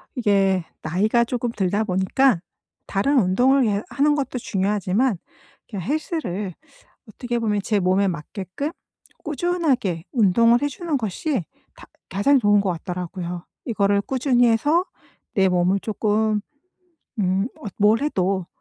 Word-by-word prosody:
이게 195 -6 +2 0.2
나이가 210 +9 +2
쪼끔 240 0 -2
들다 200 0 0
보니까 190 +3 +2 0.5
다른 270 +8 +2
운동을 250 +8 +3
예 205 -1 0
하는 295 +1 +2
것도 270 -3 -2
중요하지만 200 +2 0 0.5
그 210 - -6
헬스를 210 - -3 0.6
어떻게 240 +2 -3
보면 210 -3 0
제 210 -2 +1
몸에 190 +2 +2
맞게끔 185 - -4 0.5
꾸준하게 275 - -1
운동을 230 +2 +4
해 290 - +1
주는 310 0 -2
것이 225 - -2 0.3
다 - - -14 0.2
가장 235 +9 +3
좋은 205 -3 +4
것 190 -2 0
같더라고요. 175 +1 -5 0.2
이거를 200 -3 +1
꾸준히 250 0 +2
해서 295 +11 +2 0.5
내 190 -1 +4
몸을 180 +2 +2
쪼끔 215 0 0 0.8
음 190 +3 +1
어 215 - -7
뭘 215 +4 +4
해도 190 - 0
210 Hz, 270 characters per minute, -22 LUFS, 190-250 Hz, 0.8 s, 운동을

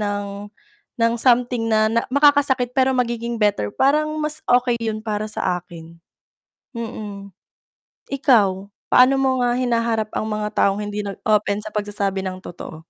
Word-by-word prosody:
ng 205 0 -3 0.7
ng 230 0 +1
something 245 -1 +2
na 215 -1 +3
na 230 +1 +2
makakasakit 285 -3 +3
pero 265 0 +3
magiging 235 -1 -1
better 200 - +1
parang 305 +3 +2
mas 300 0 -3
okey 245 -1 +2
yun 220 -2 -3
para 215 -1 -3
sa 195 -4 -2
akin. 170 -1 -13 0.8
Mm. 210 -4 -7 0.8
Ikaw, 215 -9 +2 0.2
paano 255 +2 +6
mo 260 -1 +2
nga 240 0 +2
hinaharap 230 -3 0
ang - - -2
mga 210 -1 -2
taong 200 +1 +2
hindi 205 0 -4
nag-open 205 +1 0
sa 215 - -7
pagsasabi 205 -2 -3
ng 185 0 -5
totoo? 170 -3 -9
220 Hz, 145 wpm, -21 LUFS, 205-250 Hz, 0.8 s, paano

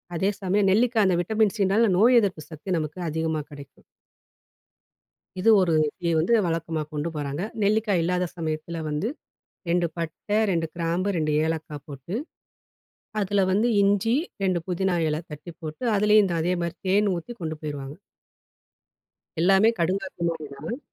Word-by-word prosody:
அதே 190 +4 +1
சமயம் 195 +1 +2
நெல்லிக்கா 230 +2 +3
அந்த 190 - +3
விட்டமின் 215 +2 +1
சினால 200 +4 +3
நோய் 240 +5 +6
எதிர்ப்பு 185 -6 -2
சக்தி 155 +4 -9
நமக்கு 155 +3 -5
அதிகமா 160 0 -1
கடைக்கும். 140 -1 -12 1.6
இது 220 - +3
ஒரு 175 -3 +2 0.3
டீ 170 - 0
வந்து 170 +9 +2
வழக்கமா 165 -1 -2
கொண்டு 150 +2 -2
போறாங்க. 145 +1 -3 0.2
நெல்லிக்காய் 205 -3 +2
இல்லாத 180 +1 0
சமயத்தில 160 0 -3
வந்து 150 +7 -1 0.6
2 175 0 +2
பட்டை, 170 +5 -3
2 165 -2 0
கிராம்பு, 170 +3 -1
2 155 -1 0
ஏலக்கா 160 -2 -3
போட்டு, 140 +6 -7 1.1
அதில 200 0 +1
வந்து 215 +5 +2
இஞ்சி 205 +4 +2 0.3
2 185 -2 +2
புதினா 185 0 0
எல 155 - -1
தட்டி 150 +3 -9
போட்டு, 155 +9 -6
அதிலயும் 210 0 +5
அந்த 175 - -2
அதே 180 +2 +1
மாதிரி 170 0 -3
தேனு 200 +1 +3
ஊத்தி 170 +8 -8
கொண்டு 160 -2 -3
போயிருவாங்க. 145 -2 -6 1.5
எல்லாமே 195 +5 +5
கடுங்காப்பி 185 +2 -2
மாதிரி 160 -2 -5
தான். 160 - -5
175 Hz, 145 wpm, -25 LUFS, 160-200 Hz, 1.6 s, நோய்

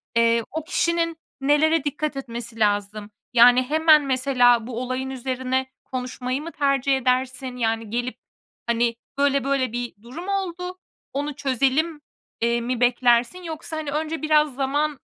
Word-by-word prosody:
eee, 230 0 +3
o 320 0 -3
kişinin 335 0 0 0.2
nelere 295 +3 +3
dikkat 295 0 -2
etmesi 235 -3 -7
lazım? 205 0 0 0.2
Yani, 245 +1 +7
hemen, 305 +2 +4
mesela, 250 -3 +3
bu 245 -1 -4
olayın 255 +1 -3
üzerine 260 0 -2 0.2
konuşmayı 255 +1 -4
mı 335 +2 -7
tercih 275 -2 +1
edersin? 255 0 0
Yani, 225 -2 -1
gelip, 245 +3 -3 0.5
hani, 235 0 +1 0.2
"böyle, 280 -1 +2
böyle 270 -3 0
bir 240 0 -4
durum 275 - -9
oldu 365 -2 -3 0.4
onu 290 +1 -3
çözelim", 280 +4 0 0.4
i 235 +1 +1
mi 245 +1 -2
beklersin 245 +6 +2
yoksa, 320 -1 -6
hani, 305 -2 -4
önce 310 +2 -2
biraz 305 -3 +3
zaman, 285 +2 -1
265 Hz, 140 wpm, -23 LUFS, 245-300 Hz, 0.5 s, Yani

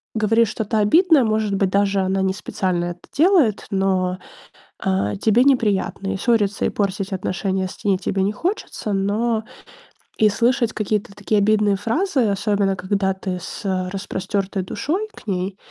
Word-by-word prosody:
говорит 225 +1 +3
что-то 220 +1 -2
обидное, 315 - +5
может 215 -2 0
быть 195 -1 +1
даже, 200 0 +2
она 190 0 0
не 190 - +1
специально 185 -3 -2
это 175 0 -5 0.2
делает, 310 - +3
но, 185 -1 0 0.6
а, 100 +2 0
тебе 225 - +3
неприятно. 205 -6 +1
И - - -2
ссориться, 205 -2 +1
и - - +3
портить 195 -1 -2
отношения 190 0 -2
с - - -13
ней 195 -2 +2
тебе 190 0 -1
не 200 +2 +1
хочется, 330 - -3
но 215 +3 0 0.7
и 215 - +5
слышать 235 +2 +1
какие-то 210 -1 -2
такие 205 +1 0
обидные 210 0 +3
фразы, 260 - 0
особенно 200 -1 +1
когда 190 0 0
ты 190 -1 -4
с - - -7 0.3
распростертой 195 0 -3
душой 360 - -2
к - - -16
ней, 190 0 -2
200 Hz, 155 wpm, -21 LUFS, 190-220 Hz, 0.7 s, обидное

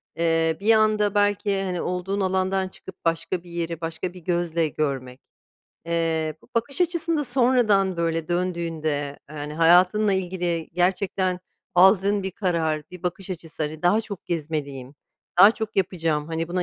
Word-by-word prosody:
Eee, 165 -1 +1
bir 225 +2 +5
anda 215 -1 +2
belki, 205 -1 +1
hani, 180 -2 -2
olduğun 180 +3 -2
alandan 190 0 0
çıkıp 185 -1 -13
başka 165 +2 -1
bir 175 - -14
yeri, 170 -1 -4
başka 165 +2 -4
bir 180 - -10
gözle 170 -2 0
görmek. 135 -4 -3 0.7
Eee, 165 -2 0
bu - - -21
bakış 235 +8 -1
açısında 335 -3 +1
sonradan, 240 -7 +3
böyle, 165 -1 -1
döndüğünde, 170 -3 -2 0.4
eee, 155 - -9
hani, 150 +1 -5
hayatınla 180 +6 +4
ilgili 175 -3 -2
gerçekten 185 +1 0 0.3
aldığın 195 +2 +5
bir 190 - -2
karar, 165 -5 -1
bir 180 -1 -11
bakış 180 +2 -4
açısı, 165 -3 -6
hani, 155 +2 -4
daha 190 +5 +4
çok 205 -4 -8
gezmeliyim, 145 -5 -4 0.4
daha 200 +3 +10
çok 220 -1 -5
yapacağım, 165 -5 0
hani, 165 0 -3
buna 180 +1 -1
180 Hz, 150 wpm, -24 LUFS, 165-195 Hz, 0.7 s, daha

